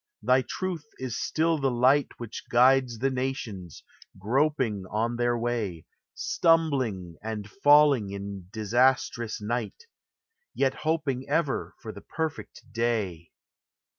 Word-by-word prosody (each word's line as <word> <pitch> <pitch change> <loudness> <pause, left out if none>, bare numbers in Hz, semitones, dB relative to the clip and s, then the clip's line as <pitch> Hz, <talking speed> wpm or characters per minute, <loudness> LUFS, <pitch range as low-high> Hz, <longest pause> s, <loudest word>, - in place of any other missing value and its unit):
thy 125 +3 +4
truth 170 +1 -4
is 130 -3 -4
still 160 0 +1
the 135 -1 +1
Light 130 +4 +3
Which 120 -2 -7
guides 125 0 +4
the 135 +4 0
nations, 125 - -4 0.3
groping 120 -1 0
on 115 +3 -1
their 120 0 +1
way, 115 -9 -2 0.3
Stumbling 130 - +1
and 110 -2 -5
falling 145 - +4
in 100 -2 -7
disastrous 120 +1 +1
night, 120 - -3 0.7
Yet 135 -1 +2
hoping 145 -4 -2
ever 150 -2 -1
for 110 - -5
the 100 - -11
perfect 160 -6 -5
day. 105 -8 -1
120 Hz, 115 wpm, -27 LUFS, 110-140 Hz, 0.7 s, thy